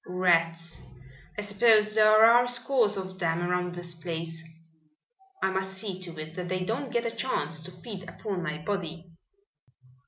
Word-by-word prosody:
"Rats. 165 -2 +1 0.6
I - - -1
suppose 215 +1 +4
there 215 0 +7
are 240 +2 +6
scores 245 -3 +1
of 185 0 -6
them 165 -1 0
around 180 0 -1
this 175 -1 -5
place. 165 -1 -5 1.0
I 190 - +2
must 190 0 -2
see 190 -1 -4
to 170 -3 -5
it 155 0 -7
that 180 0 -5
they 185 0 -1
don't 245 +6 -3
get 235 0 0
a 230 - -1
chance 170 -11 -2
to 175 +3 -7
feed 185 0 -9
upon 195 -2 -4
my 150 -3 -3
body!" 175 -4 -4
185 Hz, 160 wpm, -28 LUFS, 170-215 Hz, 1.0 s, there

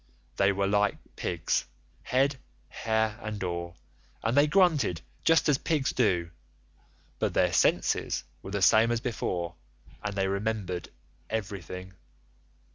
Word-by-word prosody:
They 100 0 +4
were 100 0 0
like 105 +1 +2 0.2
pigs—head, 130 - -1 0.3
hair, 110 0 0
and 110 -2 -4
all, 85 -1 -4 0.5
and 115 +2 +1
they 145 +1 +6
grunted 155 - +3 0.2
just 165 0 +4
as 145 -2 +3
pigs 145 -5 0
do; 85 -9 +1 0.9
but - - 0
their - - +3
senses - - +2 0.2
were - - -8
the 100 -1 -1
same 110 +4 +6
as 120 - +1
before, 90 -8 -2 0.5
and 105 -1 -3
they 95 -1 +1
remembered 100 -2 -2 0.4
everything. 95 -3 -5
105 Hz, 120 wpm, -28 LUFS, 95-120 Hz, 0.9 s, they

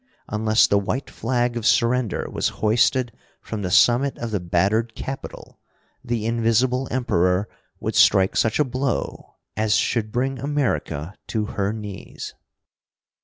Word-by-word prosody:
Unless 110 +1 +3
the 100 - +3
white 125 +7 -3
flag 120 +1 -1
of 120 - -3
surrender 120 -1 +2
was - - -1 0.2
hoisted 120 +3 +3 0.3
from 110 -2 -6
the 90 - -2
summit 120 +8 +4
of 120 -1 -5
the 105 - 0
battered 100 +7 0
Capitol, 135 0 -7 0.4
the 120 -3 -2
Invisible 120 +3 +1
Emperor 90 -6 +1 0.3
would - - -3
strike 95 0 +4
such 110 - +2
a 150 - +4
blow 130 0 -3 0.2
as 110 0 +2
should 110 -3 0
bring 130 +3 -1
America 130 - -2
to 110 -2 -1
her 100 -1 0
knees! 105 -3 -7
115 Hz, 135 wpm, -23 LUFS, 105-125 Hz, 0.4 s, summit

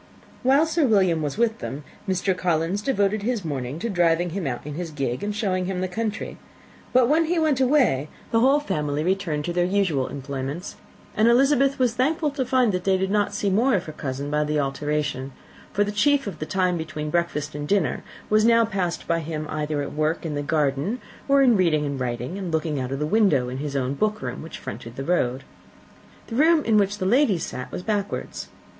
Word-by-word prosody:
While 275 +5 +4
Sir 320 -2 +1
William 190 -7 +3
was 145 +1 -3
with 230 -1 +1
them, 140 +3 -6 0.3
Mr. 190 0 +1
Collins 175 +2 0
devoted 205 -4 +1
his 220 -3 -2
mornings 140 0 -4
to 235 - -1
driving 175 -1 +2
him 180 -3 -3
out 125 0 -4
in 150 - -5
his 170 +2 -4
gig, 135 -5 -3
and 205 0 -2
showing 190 -4 0
him 190 -1 -2
the 185 - -1
country: 215 +3 -4 0.5
but 250 -1 +5
when 320 +4 +3
he 345 +2 0
went 305 -5 +2
away, 250 - +3 0.2
the 225 - +3
whole 270 +5 +5
family 150 - -2
returned 175 -5 -1
to 175 - -2
their 175 0 +2
usual 180 -8 +1
employments, 140 +4 -5 0.4
and 215 +2 +4
Elizabeth 275 +3 +4
was 250 -3 +2
thankful 300 +5 +1
to 275 -2 -1
find 255 -3 +3
that 180 -1 -2
they 190 -1 +3
did 190 +1 -1
not 205 -1 +2
see 200 - -1
more 235 +5 +3
of 180 - 0
her 155 - -7
cousin 140 -1 -4
by 150 0 +2
the 150 0 0
alteration; 145 -1 -2 0.4
for 205 - +2
the 205 - -2
chief 280 +7 +2
of 190 -7 -6
the 155 - -4
time 185 -2 +1
between 150 -1 -4
breakfast 155 -3 -1
and 145 0 -5
dinner 180 -9 +1 0.2
was 215 0 +3
now 230 0 +5
passed 190 -5 -3
by 170 0 +1
him 155 -1 -4
either 150 -1 -2
at - - -6
work 155 +3 -1
in 155 - -2
the 145 - -2
garden, 145 - 0 0.3
or 275 0 +5
in 245 -3 +5
reading 165 -6 +2
and 140 -1 -3
writing, 125 - -3
and 185 -3 -4
looking 155 -2 -1
out 130 0 -3
of 135 - -2
window 170 - +3
in 130 - -5
his 145 -1 -4
own 130 0 0
book 215 +8 0
room, - - -4
which 160 - -8
fronted 115 +1 -8
the 135 - -4
road. 135 -7 0 0.8
The 225 - -7
room 315 +3 +4
in 220 -2 +3
which 200 0 +1
the 190 - -3
ladies 215 - +3
sat 125 - -7
was 180 - -5
backwards. 205 -1 -3
180 Hz, 215 wpm, -24 LUFS, 150-220 Hz, 0.8 s, but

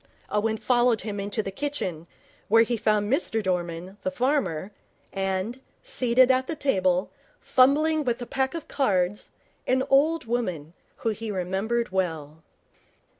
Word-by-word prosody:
Owen 220 +1 0
followed 240 -1 +2
him 210 -2 -4
into 205 +2 -2
the 195 - -4
kitchen, 190 - -4 0.4
where 225 +2 +6
he 235 +1 -1
found 210 -2 +1
Mr 225 -7 +1
Dorman, 180 0 -3
the - - -1
farmer, 215 - -1 0.4
and, 195 +6 -2 0.2
seated 255 +1 +3
at 260 0 +1
the 325 - -3
table, 185 -10 +1 0.3
fumbling 300 +4 +3
with 245 -2 -1
a 245 - -5
pack 265 +4 -1
of 330 - -6
cards, 195 -7 0 0.4
an 260 +1 +2
old 300 +2 +3
woman, 185 -10 -3 0.2
whom 225 - -1
he 225 +1 -6
remembered 195 +4 -1
well. 160 -5 -3
220 Hz, 140 wpm, -26 LUFS, 185-255 Hz, 0.4 s, where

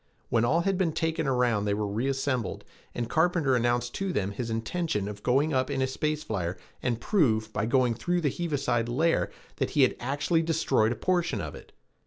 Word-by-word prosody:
When 115 -1 +2
all 155 +8 +3
had 195 +1 0
been 170 -4 +1
taken 160 -1 -1
around 120 -5 +2
they 100 -1 +1
were 105 0 -1
reassembled 130 +2 -1 0.3
and 120 -1 -2
Carpenter 160 -3 +2
announced 120 0 +1
to 195 -1 -2
them 100 - -1
his 115 +3 -4
intention 115 - -1
of 105 0 -7
going 140 +7 +2
up 130 0 +1
in 140 -1 -1
a 130 - +3
space 150 +3 -2
flyer 95 - -3 0.2
and 120 -3 -1
prove, 110 - +1
by 105 - -1
going 125 -1 +3
through 175 +9 -1
the 145 -4 +1
heaviside 140 -8 -1
layer, 160 +7 +2 0.3
that - - 0
he 145 - +3
had 130 - +3
actually 145 +6 0
destroyed 150 -9 +2
a - - -1
portion 175 +7 0
of - - -5
it. - - -12
130 Hz, 200 wpm, -28 LUFS, 115-160 Hz, 0.3 s, all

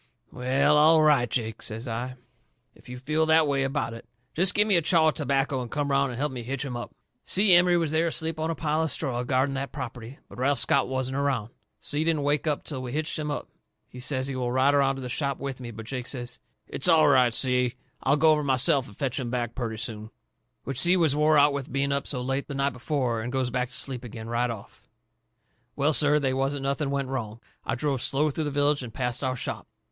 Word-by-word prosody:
"Well, 140 +4 +2
all 155 +1 +6
right, 140 -6 +4
Jake," 115 -2 -3
says 115 +4 -6
I, 120 +3 -4 0.6
"if - - -18
you 125 - -7
feel 155 +5 0
that 160 -1 +4
way 140 -1 +1
about 135 -3 -1
it. 115 0 -11 0.3
Jest 180 +3 +3
give 210 +1 +4
me 205 - +3
a 170 - +4
chaw 160 0 +4
of - - -2
tobacco 135 -1 0
and 120 - -6
come 145 +1 -2
around 140 0 +2
and 120 - -6
help 145 +2 -1
me 125 -2 -6
hitch 135 +4 -3
'em 125 -3 -5
up." 120 - -7 0.3
Si 195 0 +4
Emery 175 0 +5
was 165 -3 0
there 160 +2 +2
asleep 160 -1 -1
on 160 +1 -1
a 165 - -1
pile 155 +1 0
of 160 - 0
straw 130 -6 -1
guarding 130 +2 0
that 135 0 -4
property. 125 -1 -7
But - - -12
Ralph 140 +2 +2
Scott 140 - +2
wasn't 130 0 -2
around. 135 -6 -1 0.3
Si 150 +2 +1
didn't 160 -3 0
wake 145 +2 0
up 150 -2 0
till 135 -4 -5
we 125 -1 -6
had 155 +1 -1
hitched 155 - -4
'em 150 -1 -3
up. 145 - -4 0.4
He 125 - -12
says 130 0 -1
he 135 - -3
will 125 -1 -2
ride 130 +3 +3
around 135 -1 +3
to 135 - -7
the - - -4
shop 140 +2 -2
with 135 -1 -5
me. 120 -2 -7
But 110 -1 -9
Jake 125 0 -5
says: 125 -2 -4 0.3
"It's - - -2
all 155 -2 +6
right, 130 -4 +5
Si. 125 0 0 0.3
I'll 140 +3 +2
go 160 +2 +5
over 150 -1 +2
myself 135 +1 +2
and 100 - -15
fetch 135 -2 -2
'em 125 -2 -3
back 120 -1 -2
purty 115 -3 -4
soon." 110 -1 -4 0.5
Which 135 -1 -4
Si 175 +7 +4
was 160 -5 +2
wore 150 +1 +4
out 145 0 +5
with 140 -2 -5
being 140 +1 0
up 140 0 -1
so 125 -3 -3
late 135 +2 -2
the 140 - -6
night 140 0 0
before, 125 -3 -2
and 120 +2 -4
goes 130 -2 -1
back 125 0 -1
to 125 - -7
sleep 130 -3 -2
agin 110 -1 -8
right 120 +1 0
off. 110 -4 -9 0.9
Well, 145 +2 +2
sir, 145 0 +4
they 135 -3 0
wasn't 135 +1 -1
nothing 140 +1 -1
went 140 -1 -2
wrong. 115 -4 -4 0.2
I - - -2
drove 135 -1 -1
slow 150 +4 +1
through 155 +2 -3
the - - -1
village 145 0 +1
and 120 -3 -7
past 125 +2 -2
our 130 -1 0
shop. - - -5
135 Hz, 245 wpm, -26 LUFS, 125-150 Hz, 0.9 s, all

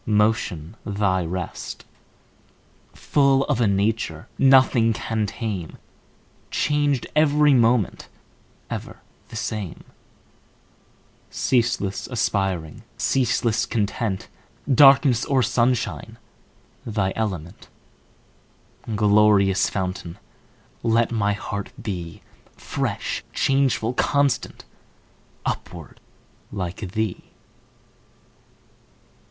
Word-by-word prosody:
Motion 105 -5 0
thy 100 -3 0
rest; 90 +1 -5 1.1
Full 140 -2 +2
of 120 - 0
a 115 - +4
nature 100 -5 -1
Nothing 130 -4 +5
can 110 -1 -2
tame, 105 -6 -5 0.7
Changed 145 -3 +1
every 150 -1 +4
moment, 115 -4 +2 0.6
Ever - - -7 0.3
the - - -10
same; 110 -5 -4 1.5
Ceaseless 115 -6 0
aspiring, 95 - -1 0.2
Ceaseless 120 -3 +1
content, 105 -2 -2 0.5
Darkness 135 -2 +6
or 135 -2 +2
sunshine 120 0 0 0.7
Thy 100 -4 -1
element; 95 -7 -4 1.3
Glorious 105 -2 +4
fountain. 90 -3 -4 0.6
Let 115 0 +2
my 105 -3 +1
heart 100 0 -5
be 85 -6 -6 0.3
Fresh, - - -3
changeful, 135 -4 +1
constant, 140 +1 0 0.8
Upward, - - -5 0.5
like 90 0 -5
thee! 110 0 -2
110 Hz, 75 wpm, -23 LUFS, 95-125 Hz, 1.5 s, Darkness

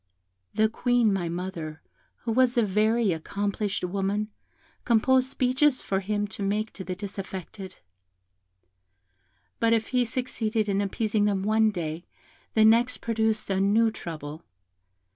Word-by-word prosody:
The 220 - +4
Queen, 240 -1 +2
my 175 -3 -1
mother, 170 -3 -5 0.4
who 230 - -1
was 250 +1 +3
a 235 - +5
very 215 +2 +2
accomplished 200 +5 -2
woman, 200 +3 -1 0.5
composed 255 +3 +3
speeches 260 +1 +2
for 195 - 0
him 205 +1 -1
to 200 - -8
make 210 +2 -1
to 190 - -7
the 185 0 -4
disaffected; 195 -1 -7 1.8
but 230 0 +3
if 225 -1 0
he 250 -1 +2
succeeded 225 -3 -1
in 200 0 +1
appeasing 210 +1 0
them 200 -2 0
one 220 +1 +3
day, 170 -3 -4 0.5
the 220 -1 +6
next 235 +3 +4
produced 220 -2 -1
a 190 - +1
new 220 +3 +3
trouble. 155 -5 -7
210 Hz, 135 wpm, -26 LUFS, 195-230 Hz, 1.8 s, the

